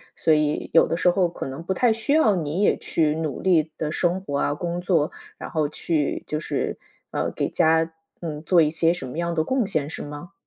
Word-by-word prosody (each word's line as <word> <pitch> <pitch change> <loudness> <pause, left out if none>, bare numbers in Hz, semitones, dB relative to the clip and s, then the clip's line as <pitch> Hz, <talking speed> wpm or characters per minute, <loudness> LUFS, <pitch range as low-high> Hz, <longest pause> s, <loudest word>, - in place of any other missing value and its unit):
所 160 - +3
以 150 -1 0
有 165 - +6
的 165 - -1
时 180 - +4
候 175 -1 +2
可 170 - -6
能 135 +5 -7
不 190 - -1
太 240 +1 +3
需 230 +6 -1
要 225 -11 +4
你 165 +3 -2
也 - - +3
去 155 -2 0
努 155 -4 -3
力 165 -4 +2
地 155 -1 -2
生 175 +3 0
活 145 -7 -3
啊 145 - +1
工 175 +3 -3
作， 165 -4 +1 0.3
然 - - -7
后 155 -3 0
去 155 -1 -1
就 150 - -2
是， - - -2 0.3
呃， - - -1
给 - - -1
家， 160 +1 +2 0.3
嗯， 155 -2 -5
做 170 +1 +4
一 150 - +3
些 165 +1 +2
什 155 -7 -6
么 125 - -7
样 170 0 -1
的 160 -1 +1
贡 260 +3 0
献 155 -6 -1
是 - - -5
吗？ 150 +4 -9
165 Hz, 245 characters per minute, -24 LUFS, 150-180 Hz, 0.3 s, 有